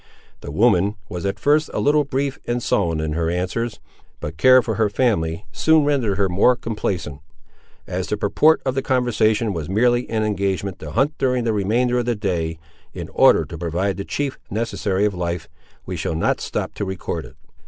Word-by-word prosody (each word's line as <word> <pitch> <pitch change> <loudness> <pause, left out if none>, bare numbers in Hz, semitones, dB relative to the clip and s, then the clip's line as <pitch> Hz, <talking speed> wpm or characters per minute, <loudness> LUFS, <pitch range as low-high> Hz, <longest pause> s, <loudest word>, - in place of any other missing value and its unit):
The - - -8
woman 100 +3 +3
was 90 +2 -3
at 95 - -2
first 150 +2 +2
a - - 0
little 150 +1 +3
brief 140 +2 -2
and 120 0 -1
sullen 85 -5 +1
in 80 0 -2
her 80 +1 0
answers, 95 +7 -2 0.4
but 75 +1 -6
care 130 +8 +6
for 110 - -2
her 110 0 +1
family 100 -8 0
soon 160 - +3
rendered 125 -9 +1
her 100 -1 +2
more 100 +8 +3
complaisant. 95 - -3 0.7
As - - -3
the - - -1
purport 160 +1 +3
of 130 - 0
the 135 - -1
conversation 115 -5 +1
was 80 -2 -5
merely 120 +4 +2
an 110 -1 0
engagement 100 -3 -1
to 75 - -7
hunt 140 - +1
during 125 -2 +1
the 115 -1 0
remainder 120 +5 +1
of 120 - -1
the 120 - +1
day, 85 -6 -2 0.4
in - - -6
order - - +5
to 85 - -8
provide 90 +3 -1
the 100 - -3
chief 140 +5 -3
necessary 105 -2 -1
of 105 - 0
life, 85 -2 -3 0.4
we - - -4
shall 80 - -2
not 80 - 0
stop - - -3
to - - -4
record 95 -2 -4
it. - - -13
105 Hz, 195 wpm, -21 LUFS, 90-125 Hz, 0.7 s, care